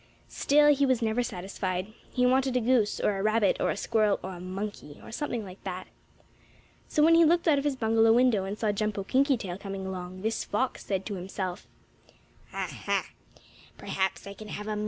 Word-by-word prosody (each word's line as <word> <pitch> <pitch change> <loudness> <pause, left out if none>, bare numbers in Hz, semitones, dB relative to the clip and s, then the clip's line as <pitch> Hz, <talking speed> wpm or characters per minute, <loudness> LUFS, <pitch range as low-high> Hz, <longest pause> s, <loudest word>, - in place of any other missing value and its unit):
Still 295 +1 +4
he 280 0 +1
was 260 -3 +2
never 225 +2 +1
satisfied. 190 -2 -4 0.2
He 250 -1 +2
wanted 260 0 +3
a - - +3
goose, 235 -3 +2
or 200 -2 +1
a - - -1
rabbit, 215 -1 +2
or - - +2
a - - -1
squirrel, 215 -3 +1
or 190 - -5
a 175 - -9
monkey, 185 -4 -6
or - - -10
something 240 -3 -3
like 185 0 -12
that. 185 -1 -5 1.0
So 300 - +2
when 330 +2 +6
he 335 0 +7
looked 335 +2 +3
out 295 -3 +5
of - - -3
his 290 -2 0
bungalow 225 -2 +3
window, 240 -5 +4
and 195 +2 -4
saw 215 -2 +1
Jumpo 205 -1 -2
Kinkytail 255 -8 +1
coming 195 -1 -5
along, 185 0 -6
this 220 +1 -1
fox 255 +5 -2
said 190 -1 -2
to 210 - -4
himself: 185 0 -5 0.8
"Ah, - - -3
ha! - - -2
215 Hz, 175 wpm, -28 LUFS, 190-255 Hz, 1.0 s, he